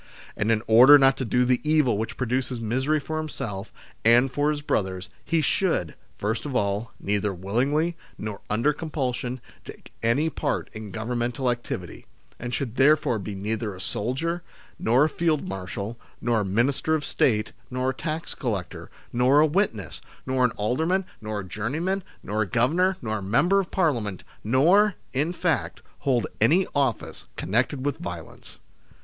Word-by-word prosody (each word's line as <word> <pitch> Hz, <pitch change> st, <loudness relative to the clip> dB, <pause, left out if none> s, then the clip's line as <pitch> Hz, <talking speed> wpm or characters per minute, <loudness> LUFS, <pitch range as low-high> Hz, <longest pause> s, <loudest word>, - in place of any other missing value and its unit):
And 110 Hz, -, +1 dB
in 110 Hz, 0 st, +1 dB
order 125 Hz, +6 st, +9 dB
not 135 Hz, -1 st, +5 dB
to 130 Hz, -, -2 dB
do 125 Hz, +2 st, +2 dB
the 125 Hz, 0 st, +2 dB
evil 150 Hz, -6 st, +3 dB
which 110 Hz, +2 st, -3 dB
produces 125 Hz, 0 st, -1 dB
misery 130 Hz, +7 st, 0 dB
for 155 Hz, +2 st, -4 dB
himself 110 Hz, -10 st, -5 dB, 0.3 s
and 120 Hz, +3 st, +5 dB
for 145 Hz, +3 st, +1 dB
his 150 Hz, -1 st, -2 dB
brothers, 95 Hz, -8 st, -1 dB
he 165 Hz, -2 st, +1 dB
should, 155 Hz, -, 0 dB, 0.2 s
first 110 Hz, +3 st, -2 dB
of 140 Hz, -3 st, -5 dB
all, 100 Hz, +1 st, 0 dB
neither 105 Hz, 0 st, 0 dB
willingly, 135 Hz, -, 0 dB, 0.2 s
nor 105 Hz, -2 st, -5 dB
under 115 Hz, +8 st, +2 dB
compulsion, 130 Hz, -5 st, -3 dB, 0.2 s
take -, -, -12 dB
any 120 Hz, +8 st, +2 dB
part 150 Hz, -2 st, -2 dB
in 110 Hz, -2 st, -7 dB
Governmental 120 Hz, +3 st, -1 dB
activity, 120 Hz, 0 st, -6 dB, 0.3 s
and 120 Hz, 0 st, -5 dB
should 125 Hz, -1 st, -3 dB
therefore 140 Hz, -4 st, +4 dB
be 100 Hz, +1 st, -5 dB
neither 105 Hz, +1 st, -3 dB
a -, -, -11 dB
soldier, 135 Hz, -, -2 dB, 0.4 s
nor 120 Hz, +5 st, +4 dB
a -, -, +4 dB
Field 155 Hz, -1 st, 0 dB
Marshal, 100 Hz, +4 st, -5 dB, 0.2 s
nor 120 Hz, -1 st, +1 dB
a 105 Hz, -, -1 dB
Minister 130 Hz, +10 st, +1 dB
of 150 Hz, -, -2 dB
State, 110 Hz, -3 st, +1 dB, 0.2 s
nor 130 Hz, +1 st, 0 dB
a -, -, -7 dB
tax 155 Hz, +4 st, -4 dB
collector, 105 Hz, -9 st, -4 dB, 0.2 s
nor 125 Hz, +4 st, +4 dB
a 155 Hz, -, +6 dB
witness, 155 Hz, -, -1 dB, 0.2 s
nor 130 Hz, -1 st, +1 dB
an 125 Hz, -, +4 dB
alderman, 160 Hz, -, +1 dB, 0.2 s
nor 105 Hz, -1 st, -3 dB
a 95 Hz, -, -10 dB
juryman, 155 Hz, -, -2 dB, 0.2 s
nor 105 Hz, +2 st, -1 dB
a 105 Hz, -, 0 dB
governor, 170 Hz, -, +2 dB
nor 110 Hz, -2 st, -1 dB
a -, -, -8 dB
Member 140 Hz, -, +3 dB
of 190 Hz, -, -2 dB
Parliament, 120 Hz, -, 0 dB, 0.2 s
nor, 175 Hz, -, +4 dB, 0.2 s
in 145 Hz, +6 st, +1 dB
fact, 150 Hz, -, -1 dB, 0.2 s
hold 130 Hz, -4 st, +1 dB, 0.2 s
any 170 Hz, -, +5 dB
office 135 Hz, -5 st, -1 dB
connected 130 Hz, +6 st, 0 dB
with 145 Hz, -2 st, 0 dB
violence. 85 Hz, -, -8 dB
125 Hz, 165 wpm, -25 LUFS, 110-150 Hz, 0.4 s, order